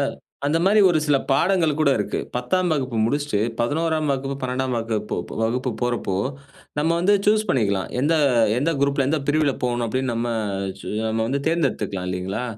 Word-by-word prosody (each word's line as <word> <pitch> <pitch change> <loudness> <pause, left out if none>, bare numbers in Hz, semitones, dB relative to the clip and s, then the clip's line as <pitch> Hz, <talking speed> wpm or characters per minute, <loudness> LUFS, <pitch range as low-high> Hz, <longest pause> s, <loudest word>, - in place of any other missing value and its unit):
அ - - +2 0.4
அந்த 160 +3 +2
மாதிரி 210 +2 +5
ஒரு 160 - +2
சில 145 -1 +4
பாடங்கள் 170 +2 +3
கூட 140 - +4
இருக்கு. 105 - -2 0.2
10தாம் 175 +9 0
வகுப்பு 130 -6 -1
முடிச்சிட்டு, 145 -4 0 0.2
11ஆம் 155 +4 0
வகுப்பு, 135 +1 -3
12ஆம் 130 0 -1
வகுப் 110 -2 -3 0.3
வகுப்பு 125 +3 0
போறப்போ, 120 -5 -1 0.6
நம்ம 155 +2 +2
வந்து 200 +4 +4
சூஸ் 215 +1 +3
பண்ணிக்கலாம், 100 - +1
எந்த 150 +5 +2 0.4
எந்த 155 +5 +1
குரூப்ல 140 -1 +2
எந்த 155 - +1
பிரிவில 150 -2 +2
போணும் 120 -1 0
அப்படின்னு 130 +2 -1
நம்ம 115 +1 -1 0.8
நம்ம 110 0 -1
வந்து 140 +2 -1
தேர்ந்தெடுத்துக்கலாம் 105 - -1
இல்லைங்களா? 95 +6 -3
135 Hz, 155 wpm, -23 LUFS, 120-155 Hz, 0.8 s, மாதிரி